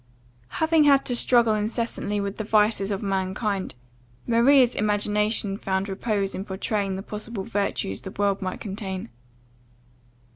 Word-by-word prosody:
Having 320 -1 +3
had 280 -1 +5
to 245 - -1
struggle 235 -2 +4
incessantly 215 -1 -2
with 200 0 -3
the 220 - -3
vices 210 -1 +2
of 200 +1 -3
mankind, 195 - -2 0.5
Maria's 245 +2 +5
imagination 210 0 0
found 190 -1 -1
repose 200 0 -2
in 190 - -4
pourtraying 195 0 -2
the 190 - -5
possible 215 -1 -6
virtues 200 - -2
the - - -7
world 200 0 -1
might 185 -1 -4
contain. 190 - -5
205 Hz, 135 wpm, -25 LUFS, 195-230 Hz, 0.5 s, had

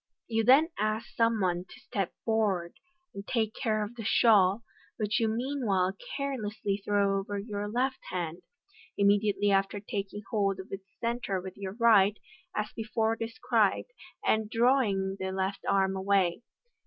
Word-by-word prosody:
You 225 -1 0
then 275 +8 +6
ask 215 +1 -1
some 230 -1 +2
one 180 -2 0
to - - -15
step 195 -4 -3
forward 205 -6 +1 0.4
and 200 - -7
take 220 -3 0
care 215 -2 0
of 210 +3 -6
the 230 - -6
shawl, 210 -1 +4 0.3
which 210 0 0
you 225 - +2
meanwhile 220 -6 0 0.2
carelessly 220 -7 -2
throw 200 -1 +2
over 200 +1 -4
your 205 0 -4
left 255 +4 0
hand, 175 -2 -3 0.6
immediately 205 0 +3
after 195 +1 +1
t 200 0 -3
king 205 +1 -10
hold 195 -3 +1
of 190 - -9
its 195 0 -7
centre 235 -5 -1
with 185 0 -8
your 195 -1 -6
right, 210 -3 +5 0.4
as 210 0 -2
before 225 0 0
described, 230 - 0 0.3
and 220 -1 +2
drawing 225 -6 +2
the 190 0 -2
left 190 +1 -2
arm 195 -1 +2
away. 190 -1 +1
205 Hz, 155 wpm, -29 LUFS, 195-225 Hz, 0.6 s, then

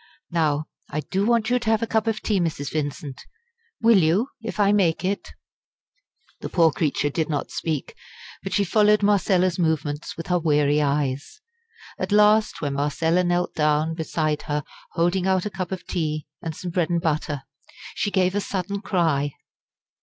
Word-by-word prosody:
"Now 155 -3 +1 0.2
I 150 - -2
do 195 +7 -1
want 235 -1 +2
you 250 - +3
to 235 -2 -2
have 220 0 +2
a - - +2
cup 220 0 0
of 220 -1 -1
tea, 205 -3 +1
Mrs. 155 -5 -2
Vincent. 145 -3 -4 0.6
Will 225 -3 +6
you, 180 - +2
if 225 -1 -6
I 200 -1 +4
make 185 -4 +2
it?" 200 +2 -2 1.1
The - - -5
poor 165 -3 +4
creature 145 0 0
did 160 +2 -1
not 145 -2 -2
speak, 155 -4 -3 0.5
but 195 - -5
she 200 +3 +2
followed 210 +2 +3
Marcella's 185 -3 +2
movements 155 -3 -1
with 165 - -5
her 180 -1 +1
weary 150 -2 +2
eyes. 140 - -1 0.6
At - - -3
last 210 +1 +4
when 145 -2 -1
Marcella 160 +5 +1
knelt 175 0 0
down 155 +1 +1
beside 155 -2 -1
her 145 0 0 0.3
holding 175 +2 +1
out 190 0 +2
a 210 - -3
cup 185 -1 -4
of 190 -1 -5
tea 155 -4 -2 0.2
and 160 -2 -5
some 180 +1 -6
bread 170 -2 0
and 170 -1 +1
butter, 150 -4 -1 0.5
she 205 - -1
gave 185 -2 +2
a 205 - 0
sudden 195 +1 -3
cry. 155 -8 +1
170 Hz, 175 wpm, -24 LUFS, 150-200 Hz, 1.1 s, Will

